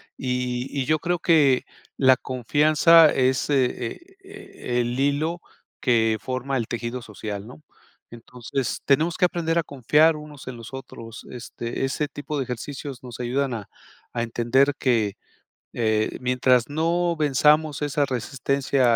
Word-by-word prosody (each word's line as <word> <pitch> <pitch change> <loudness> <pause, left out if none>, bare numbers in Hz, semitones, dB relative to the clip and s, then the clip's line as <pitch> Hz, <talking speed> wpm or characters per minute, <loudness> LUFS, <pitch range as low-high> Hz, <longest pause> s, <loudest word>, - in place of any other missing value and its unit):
y 125 -1 -2
y 135 -3 -2
yo 155 0 +2
creo 175 +1 -1
que 145 -7 +4 0.3
la 130 -1 +6
confianza 150 +6 +4
es 130 +1 +1
e 145 - +3
e 335 - -6 0.6
e - - +3
el 120 +1 -2
hilo 150 +5 0 0.4
que 115 -3 +2
forma 130 +1 -3
el 115 - -2
tejido 120 +1 -4
social, 105 -2 -7
¿no?, 125 +6 -13 0.5
entonces 120 +1 -5
tenemos 155 +4 +2
que - - +4
aprender 170 -1 -1
a - - 0
confiar 150 +4 +3
unos 150 -3 -11
en 130 - -5
los 115 +3 -11
otros, 115 -3 -9
este, 120 0 -5
ese 145 +2 -2
tipo 145 +1 -6
de 135 - 0
ejercicios 130 +2 -6
nos 125 -1 -9
ayudan 130 +2 -1
a 110 -4 -6 0.5
a 120 -1 -1
entender 120 +5 +2
que, 110 -6 +1 0.6
eh, 110 -2 0
mientras 125 0 +2
no 170 +3 0
venzamos 150 +1 +3
esa 145 0 +1
resistencia 130 0 0
130 Hz, 145 wpm, -24 LUFS, 120-150 Hz, 0.6 s, la